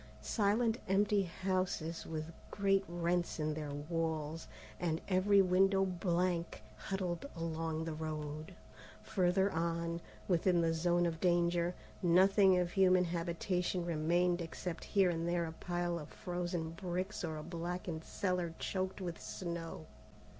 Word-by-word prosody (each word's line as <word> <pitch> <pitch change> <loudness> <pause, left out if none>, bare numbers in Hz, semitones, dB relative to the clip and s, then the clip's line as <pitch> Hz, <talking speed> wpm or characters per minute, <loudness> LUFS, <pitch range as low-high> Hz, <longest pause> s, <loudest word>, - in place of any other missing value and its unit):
Silent 225 +2 +2
empty 200 +2 +3
houses 185 -2 -2
with 160 +1 -4 0.2
great 195 -1 +2
rents 175 0 -1
in 155 0 0
their 150 -1 -4
walls, 160 +1 -2 0.3
and 165 -2 0
every 195 +1 +5
window 195 +1 +4
blank, 175 -1 -1
huddled 190 +3 -3
along 165 -1 -2
the 165 - -3
road. 155 +1 -5 0.5
Further 190 -1 +2
on, 170 +1 -1 0.3
within 180 0 +3
the 165 -1 +2
zone 175 +1 +2
of 165 -1 -1
danger, 175 0 +2 0.3
nothing 190 +2 +5
of 175 -1 +1
human 185 -1 +5
habitation 175 +1 -1
remained 175 +2 +2
except 170 +1 -5
here 195 -3 +3
and 165 0 -2
there 175 -1 +1
a 160 - -5
pile 175 +1 -2
of 150 - -9
frozen 175 -2 -3
bricks 185 +3 -3
or 160 -2 -3
a 155 - -6
blackened 170 0 -4
cellar 180 -3 -1
choked 190 0 -2
with 175 -3 -4
snow. 170 -3 -5
175 Hz, 130 wpm, -35 LUFS, 165-185 Hz, 0.5 s, every